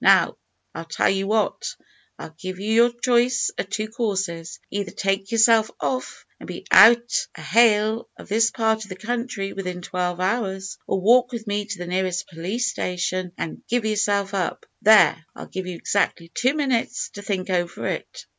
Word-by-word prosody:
Now, - - +5 0.4
I'll 165 - -7
tell 165 - +1
you 195 0 -1
what 215 0 0 0.4
I'll 160 - -10
give 185 0 -6
you 210 +3 -1
your 235 +1 +5
choice 240 0 +2
o' - - +4
two 205 +2 -3
courses. 195 -7 -3
Either 200 -2 -3
take 195 +1 -2
yourself 225 -1 +5
off 255 -1 -3
and - - -11
be - - -8
out 235 +1 +6
o' - - -9
hail 220 +4 +3
of - - -12
this 225 +3 +3
part 220 -1 0
of 210 - -12
the 185 - -6
country 210 -1 -4
within 180 -2 -5
twelve 180 -1 -2
hours, 190 -1 -2
or 195 - 0
walk 245 +6 +4
with 230 -2 -6
me 205 -1 -2
to 205 -2 -6
the 175 - -6
nearest 185 +1 -2
police 190 +9 -2
station 180 0 -2
and 160 - -5
give 240 -1 0
yourself 205 -2 0
up. 185 -3 -2 0.2
There 215 -6 +6
I'll - - -8
give 190 -1 -6
you 180 - -5
exactly 170 -2 -1
two 255 +4 +1
minutes 265 -6 -1
to 205 - -10
think 195 -2 -3
over 175 -1 -2
it." - - -5
205 Hz, 180 wpm, -23 LUFS, 185-230 Hz, 0.4 s, out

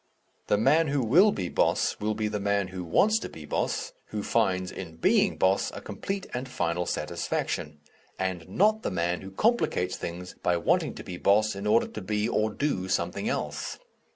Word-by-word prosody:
The 105 - +3
man 155 +9 +4
who 140 -2 +1
will 180 - +6
be 90 - -3
boss - - +1
will 110 +1 -1
be 110 0 -1
the 105 0 -2
man 100 -1 0
who 95 -1 -5
wants 215 - +3
to - - -6
be 80 - -10
boss, - - -2
who 105 -1 -4
finds, 95 -5 +1
in 85 -4 -8
being 80 - +3
boss, 95 +1 +2
a - - -5
complete 195 0 -4
and 130 +2 -4
final 85 -5 -1
satisfaction, 75 0 -3 0.4
and 95 -3 -3
not 215 +3 +3
the - - -1
man 85 -1 -1
who 95 - -8
complicates 95 - +1
things 90 +1 -6
by 90 -1 +2
wanting 85 - +1
to - - -8
be 90 - -6
boss 105 +2 +3
in 100 +1 -4
order 110 +2 +4
to 110 - -7
be, 105 +3 -1
or 110 -2 +1
do, 105 -6 -2
something 90 -2 -1
else. - - -3
100 Hz, 190 wpm, -27 LUFS, 90-115 Hz, 0.4 s, will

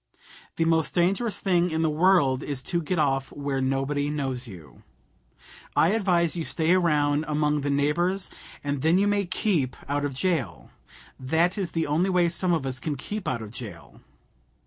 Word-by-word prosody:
The 165 - +1
most 165 -1 +1
dangerous 195 +6 +1
thing 180 -2 +2
in 160 0 -1
the - - +3
world 150 -5 +3
is 140 -3 -4
to 170 -1 0
get 175 +3 -2
off 135 -3 0
where 140 -2 -3
nobody 135 +2 0
knows 135 -4 -3
you. 80 - -13 0.9
I 165 - +4
advise 180 -6 +1
you 170 - -2
to - - -1
stay 165 +1 +2
around 150 -4 +2
among 150 -1 +1
the 145 - -2
neighbors, 175 +7 0 0.3
and 145 -1 -2
then 160 +4 +3
you 200 - +3
may 205 -1 +1
keep 170 - 0
out 145 +1 -1
of 140 -2 -2
jail. 155 - -2 0.5
That 160 +7 +1
is 195 -5 -3
the 165 -1 0
only 165 +6 +1
way 180 -2 +3
some 175 +2 0
of 160 -5 0
us 130 -1 -1
can 150 +1 -3
keep 205 +9 -5
out 120 -3 -2
of 105 - -9
jail." 110 -8 -10
155 Hz, 185 wpm, -26 LUFS, 135-175 Hz, 0.9 s, I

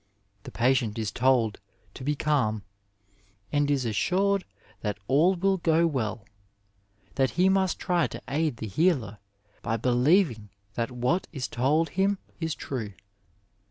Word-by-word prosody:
" 100 0 -41
The - - -8
patient 120 -2 +1
is 110 -3 -2
told 125 -4 +2 0.3
to - - -9
be 150 +2 0
calm, 125 -9 0 0.9
and 145 0 +1
is 140 -3 +1
assured 190 - +1 0.3
that 105 -2 -3
all 160 +8 +4
will 190 +2 +1
go 165 -1 +3
well; 110 -9 -2 0.9
that 135 -2 +2
he 185 +2 +5
must 190 -2 +2
try 175 -6 +1
to - - -8
aid 150 -2 -1
the 110 - -5
healer 120 - +1 0.4
by 115 - -1
believing 125 - +2 0.2
that 115 +1 -2
what 125 +9 -1
is 135 -5 -4
told 150 +7 +1
him 195 +2 +1 0.2
is 160 -2 -2
true. 115 -7 -5
135 Hz, 145 wpm, -27 LUFS, 115-170 Hz, 0.9 s, he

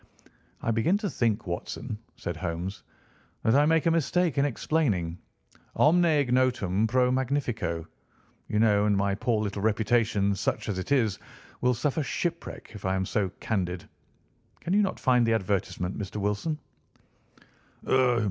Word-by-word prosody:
"I 115 - +1
begin 115 - +2
to 205 -2 -3
think, 115 -2 0
Watson," 105 +6 -4 0.2
said 85 - -5
Holmes, 90 +2 -4 0.6
"that 110 - +3
I 145 +2 +5
make 165 0 +3
a 165 - +4
mistake 165 0 +1
in 140 - +4
explaining. 110 - 0 0.6
'Omne 175 +4 +5
ignotum 125 - +2
pro 125 +2 +3
magnifico,' 120 - -1 0.6
you 105 - -1
know, 105 -2 +4
and 100 -1 +3
my 100 0 +1
poor 110 +1 0
little 100 -1 -3
reputation, 110 -2 +2
such 95 - -2
as 95 -3 -2
it 95 - -6
is, 115 -8 +2 0.4
will 125 0 +3
suffer 140 +6 0
shipwreck 170 +7 -4
if 105 - -10
I 95 0 0
am 95 0 0
so 100 -1 0
candid. 90 -5 -2 0.7
Can 175 - -2
you 210 - +5
not 195 - -1
find 125 -2 +3
the 115 -1 +2
advertisement, 95 -3 -1
Mr. 100 -1 -6
Wilson?" 105 +10 -1
110 Hz, 150 wpm, -27 LUFS, 100-140 Hz, 0.7 s, I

